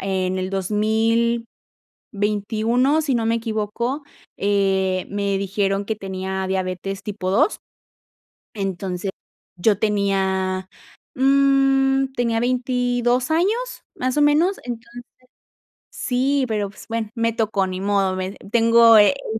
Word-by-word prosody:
en 190 -1 -1
el 185 0 -2
2021 220 - -1
si 280 -4 0
no 230 -1 0
me 225 - +2
equivoco, 230 +4 -3 0.4
eh, 190 -2 +1
me 200 -1 -1
dijeron 195 0 -1
que 220 +1 -3
tenía 190 -1 -4
diabetes 190 +1 -3
tipo 200 -3 -4
2. 285 - +2 0.9
Entonces, 195 -1 -3 0.5
yo 205 +2 +2
tenía, 190 -3 0 0.5
mm, 270 0 +3
tenía, 235 -2 0
22 245 +1 0
años, 440 +10 0
más 255 +1 -2
o - - +4
menos. 310 +7 +3
Entonces 240 0 -8 0.9
Sí, 265 +2 0
pero 210 -3 -1
pues 195 - -14
bueno, 225 -2 -3
me 230 -1 0
tocó, 215 -4 0
ni 185 0 -5
modo, 195 -1 +1
me 185 0 -3 0.2
Tengo, 230 -1 +6
eh, 210 +6 +6 0.2
un 220 - -4
220 Hz, 120 wpm, -21 LUFS, 195-245 Hz, 0.9 s, Tengo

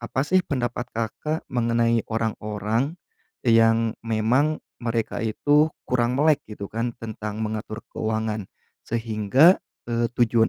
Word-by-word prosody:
apa 120 +2 -2
sih 185 +4 +4
pendapat 120 -4 -2
Kakak 115 +8 -3
mengenai 115 -1 +2
orang-orang 110 - -1 0.5
e 120 - +4
yang 115 0 +4
memang 120 +7 +2 0.3
mereka 115 -1 -1
itu 145 +7 +3 0.2
kurang 125 0 +1
melek 150 0 +4
gitu 100 -2 -7
kan 115 +2 -1
tentang 110 -1 -5
mengatur 110 0 -4
keuangan, 110 -1 -2 0.4
sehingga, 115 - +4 0.3
eee, 120 0 +1
tujuan 115 -1 +4
115 Hz, 120 wpm, -24 LUFS, 110-125 Hz, 0.5 s, sih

